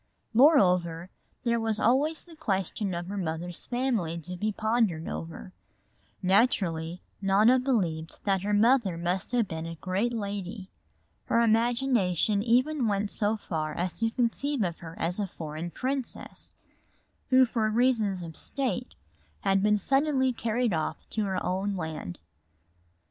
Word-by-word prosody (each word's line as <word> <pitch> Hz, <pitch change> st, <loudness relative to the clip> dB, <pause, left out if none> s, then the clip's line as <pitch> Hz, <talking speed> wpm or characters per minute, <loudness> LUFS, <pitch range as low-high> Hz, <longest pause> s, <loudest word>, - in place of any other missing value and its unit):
Moreover, 180 Hz, -, +4 dB, 0.3 s
there 235 Hz, -1 st, +1 dB
was 220 Hz, -1 st, +1 dB
always 285 Hz, +8 st, +2 dB
the 340 Hz, -2 st, -15 dB
question 195 Hz, -, -1 dB
of 170 Hz, 0 st, -4 dB
her 200 Hz, +3 st, -5 dB
mother's 175 Hz, -1 st, -4 dB
family 240 Hz, -10 st, -1 dB
to 180 Hz, +3 st, -7 dB
be 215 Hz, +4 st, -1 dB
pondered 215 Hz, -6 st, 0 dB
over. 165 Hz, +3 st, -6 dB, 0.7 s
Naturally 180 Hz, -5 st, +1 dB, 0.2 s
Nona 210 Hz, +6 st, +5 dB
believed 180 Hz, -12 st, -1 dB
that 195 Hz, -2 st, +1 dB
her 205 Hz, +2 st, -2 dB
mother 215 Hz, -3 st, +3 dB
must 180 Hz, +4 st, -2 dB
have 240 Hz, -4 st, +2 dB
been 160 Hz, -1 st, -5 dB
a 165 Hz, -, -6 dB
great 190 Hz, +8 st, -1 dB
lady. 200 Hz, -3 st, -5 dB, 0.5 s
Her 230 Hz, -, +2 dB
imagination 225 Hz, -4 st, +2 dB
even 250 Hz, +4 st, +2 dB
went 205 Hz, 0 st, 0 dB
so 215 Hz, 0 st, +1 dB
far 155 Hz, -6 st, -3 dB
as 180 Hz, 0 st, -2 dB
to 225 Hz, 0 st, +2 dB
conceive 250 Hz, +2 st, 0 dB
of 170 Hz, -3 st, -3 dB
her 165 Hz, -1 st, -9 dB
as 175 Hz, +4 st, -2 dB
a 205 Hz, -, 0 dB
foreign 160 Hz, 0 st, -6 dB
princess, 260 Hz, +6 st, -4 dB, 0.7 s
who 260 Hz, -1 st, +6 dB
for 225 Hz, -3 st, 0 dB
reasons 220 Hz, -5 st, +1 dB
of 165 Hz, -2 st, -8 dB
state 250 Hz, -3 st, -3 dB, 0.5 s
had 195 Hz, 0 st, +2 dB
been 210 Hz, +1 st, +3 dB
suddenly 270 Hz, +3 st, +2 dB
carried 235 Hz, -1 st, 0 dB
off 160 Hz, -1 st, -3 dB
to 215 Hz, -2 st, 0 dB
her 190 Hz, -2 st, -2 dB
own 195 Hz, +2 st, -1 dB
land. 160 Hz, -, -5 dB
205 Hz, 145 wpm, -28 LUFS, 175-240 Hz, 0.7 s, who